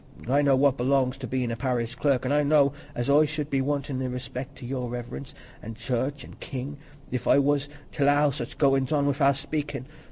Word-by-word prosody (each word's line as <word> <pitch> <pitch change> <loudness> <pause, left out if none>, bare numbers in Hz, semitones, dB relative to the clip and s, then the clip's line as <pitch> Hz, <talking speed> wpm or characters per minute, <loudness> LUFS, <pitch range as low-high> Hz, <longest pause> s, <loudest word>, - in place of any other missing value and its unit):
I 140 +3 +3
know 140 -2 +4
what 135 0 +3
belongs 130 +1 +2
to 130 - -5
bein' 125 0 -1
a - - -2
parish 120 -1 -1
clerk, 130 0 +1
and 135 - +1
I 150 - +4
know 145 -1 +4 0.2
as 120 - -2
I 145 +2 +5
should 150 -1 -4
be 135 -1 +2
wantin' 140 -1 -2
i' 130 - -1
respect 125 +2 -6
to - - -9
Your 125 -1 -3
Reverence, 120 +2 -6 0.3
an' 115 +1 -7
church, 125 +4 -2
an' - - -13
king, 135 +2 -5 0.3
if 125 - -3
I - - +6
was 145 0 +2 0.2
t' - - -6
allow 145 +1 +4
such 120 -2 -6
goins 135 -2 +2
on 145 -2 +2
wi'out 140 -1 +3
speakin'. 145 -4 -3
135 Hz, 215 wpm, -26 LUFS, 125-145 Hz, 0.3 s, I